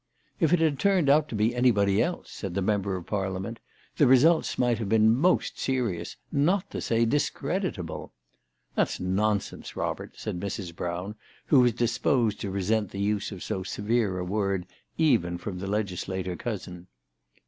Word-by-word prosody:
" - - -40
If 165 -5 +3
it 180 - +6
had 160 -4 +1
turned 185 -8 +3
out 150 +1 +4
to - - -4
be 110 +3 +2
anybody 105 -5 +3
else," 175 0 -2
said 95 -4 -6
the 100 - 0
member 100 -1 0
of 90 -2 -6
Parliament, 95 +2 -3 0.2
" - - -32
the 145 - +5
results 150 +6 +4
might 120 -2 +2
have 105 -4 -3
been 110 +1 +5
most 175 +8 +1
serious, 115 -11 -2
not 175 +7 +1
to - - -4
say 115 0 +2
discreditable." 145 - -2 0.3
" - - -48
That's - - 0
nonsense, 100 +3 -1
Robert," - - -4
said 90 - -4
Mrs. 95 -3 -5
Brown, 90 +4 -4 0.3
who 140 - +5
was 120 -2 +4
disposed 120 -1 +1
to 100 - -3
resent 100 +2 0
the 100 - -7
use 105 +1 0
of 95 -3 -7
so 95 - -3
severe 105 +1 0
a 90 - -3
word, 100 -1 -1 0.3
even 115 - +2
from 90 +1 -6
the 95 - -4
legislator 95 -3 -2
cousin. 90 -5 -6
105 Hz, 175 wpm, -27 LUFS, 95-125 Hz, 0.3 s, it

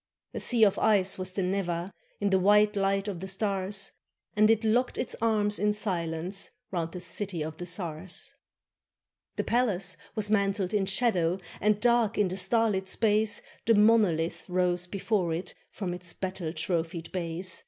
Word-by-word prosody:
A - - -3
sea 235 -3 +2
of 200 -2 +4
ice 195 -3 +2
was 185 0 -1
the 195 - -1
Neva, 180 -1 -2 0.3
In 200 -1 0
the 190 - +4
white 210 +2 +4
light 195 0 +1
of 195 -4 -4
the 190 - -6
stars, 195 0 -1 0.4
And 215 +1 +5
it 225 0 +3
locked 240 +4 +1
its - - -2
arms 210 -2 +2
in 210 0 +2
silence 180 -2 -2 0.2
Round 170 -3 -2
the 180 - -6
city 180 -1 -3
of 155 +1 -6
the 175 - -6
czars. 175 -1 -5 1.0
The - - -1
palace 195 -7 +1 0.2
was 210 -1 0
mantled 200 -2 +1
in 200 -2 +1
shadow, 190 -4 +2 0.2
And, 210 0 +2
dark 235 -1 +2
in 205 -3 +2
the 185 - -4
starlit 195 0 +1
space. 215 +1 +1 0.2
The 230 - +6
monolith 190 -6 +3
rose 180 -1 +1
before 185 -3 -1
it 175 +2 -5 0.2
From 185 -4 -4
its 180 0 -5
battle 185 -4 -4
trophied 165 0 -3
base. 175 0 -3
195 Hz, 165 wpm, -28 LUFS, 175-210 Hz, 1.0 s, The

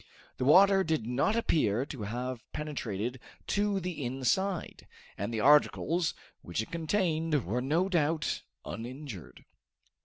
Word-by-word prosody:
The 125 - -1
water 195 +6 +6
did 160 -9 -1
not 125 - +1
appear 135 - +1
to 135 -5 -8
have 120 +3 -4
penetrated 125 -5 -3 0.3
to 205 -1 +1
the 180 -5 -4
inside, 135 +10 -1 0.3
and 100 +4 -3
the 110 -2 -1
articles 150 +4 +3 0.3
which 85 - -4
it 110 - -3
contained 165 - 0
were 115 +8 -1
no 160 +8 +1
doubt 160 -3 0 0.2
uninjured. 120 - -8
145 Hz, 125 wpm, -30 LUFS, 120-170 Hz, 0.3 s, water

